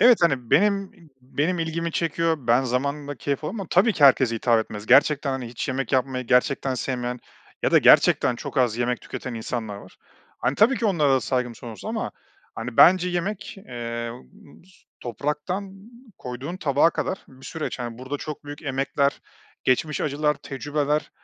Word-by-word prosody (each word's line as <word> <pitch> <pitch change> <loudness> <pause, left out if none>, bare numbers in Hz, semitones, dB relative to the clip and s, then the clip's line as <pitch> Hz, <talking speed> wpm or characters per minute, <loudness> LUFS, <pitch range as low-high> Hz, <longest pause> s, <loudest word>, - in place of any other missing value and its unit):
Evet, 240 +1 +7
hani, 135 -8 +1
benim 200 0 +3
i 165 -3 -19
benim 155 +7 -1
ilgimi 165 0 -2
çekiyor, 165 0 0
ben 120 +3 +4
zamanla 140 +3 -2
keyif 140 +3 -3
aldım 200 +7 -4
ama 190 - -5
tabii 210 +5 +4
ki 145 - +3
herkese 130 -3 +5
hitap 115 0 +2
etmez. 105 -1 -7
Gerçekten, 140 +2 +4
hani, 130 -2 -4
hiç 120 +3 -5
yemek 130 0 -2
yapmayı 130 -1 0
gerçekten 130 +2 +2
sevmeyen 125 -1 -3 0.4
ya - - +2
da - - +8
gerçekten 120 - +5
çok 140 - -7
az 120 -4 +2
yemek 120 0 0
tüketen 125 -2 -7
insanlar 110 -2 -4
var. 95 -2 -14 0.4
Hani, 130 - 0
tabii 235 +5 +4
ki 225 - 0
onlara 155 -8 +2
da 130 - +2
saygım 120 +2 -1
sonsuz 115 -4 -10
ama, - - -3 0.4
hani, 115 +1 -6
bence 180 0 +6
yemek, 190 +3 -3
eee, 115 -1 -5 0.2
bıs 185 - -19 0.3
topraktan 150 - -3 0.5
koyduğun 130 +8 -6
tabağa 145 0 +3
kadar 185 - -3
bir 130 0 -14
süreç. 160 -4 -4
Hani, 120 -1 -5
burada 130 +3 -4
çok 150 -1 -7
büyük 145 +1 -9
emekler, 140 0 0 0.4
geçmiş 150 +4 +1
acılar, 150 +1 +1
tecrübeler, 145 +2 -2
140 Hz, 170 wpm, -24 LUFS, 125-160 Hz, 0.5 s, da